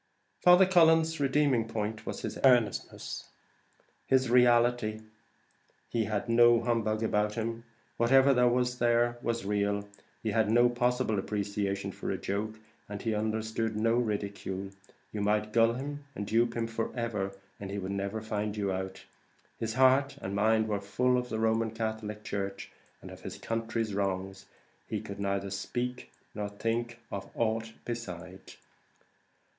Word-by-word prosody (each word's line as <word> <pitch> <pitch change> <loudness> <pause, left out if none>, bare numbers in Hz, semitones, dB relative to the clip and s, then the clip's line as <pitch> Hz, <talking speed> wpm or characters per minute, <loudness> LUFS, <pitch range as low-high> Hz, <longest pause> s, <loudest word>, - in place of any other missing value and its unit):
Father 180 +1 +7
Cullen's 165 -3 +4
redeeming 135 -4 +2
point 110 -1 -4
was - - -5
his - - -4
earnestness, 125 -5 +1 0.8
his 130 -2 +3
reality; 120 -3 +4 0.9
he 115 -2 0
had 105 +2 -2
no 120 0 +6
humbug 115 -2 0
about 105 -1 +1
him; 115 +1 -3 0.3
whatever 130 +1 +5
was 125 0 +1
there, 120 0 +2
was 115 -3 -2
real; 100 0 0 0.4
he 110 - 0
had 110 0 +2
no 120 +2 +5
possible 120 -3 +1
appreciation 100 -1 -2
for - - -6
a - - -1
joke, 110 +3 -3 0.3
and 105 -1 -6
he 115 - 0
understood 110 +1 -1
no 115 +2 +2
ridicule. 100 -4 -2 0.4
You 105 - -3
might 105 +1 +1
gull 115 0 +5
him, 145 +3 -5
and 100 - -4
dupe 115 +2 +1
him 115 - 0
for 115 0 -3
ever, 105 -5 -2 0.3
he 100 0 -5
would 95 -1 -4
never 100 +2 -3
find 105 -1 -3
you 100 -2 0
out; 95 0 -5 0.5
his 110 0 -3
heart 130 +2 +4
and 95 - -5
mind 110 +2 +3
were 105 -2 -1
full 125 +5 +1
of 125 0 -1
the 110 - -2
Roman 110 0 +1
Catholic 110 -1 -4
church 100 -1 -4 0.3
and - - -9
of - - -11
his - - -7
country's 115 -1 -2
wrongs; 95 -1 -2 0.4
he - - -2
could 100 0 -8
neither 100 0 -1
think 125 +5 -3 0.2
nor 105 -1 -3
speak 115 +3 -2
of 100 -1 -5
aught 115 0 -1
beside. 95 -5 -7
110 Hz, 150 wpm, -30 LUFS, 100-120 Hz, 0.9 s, Father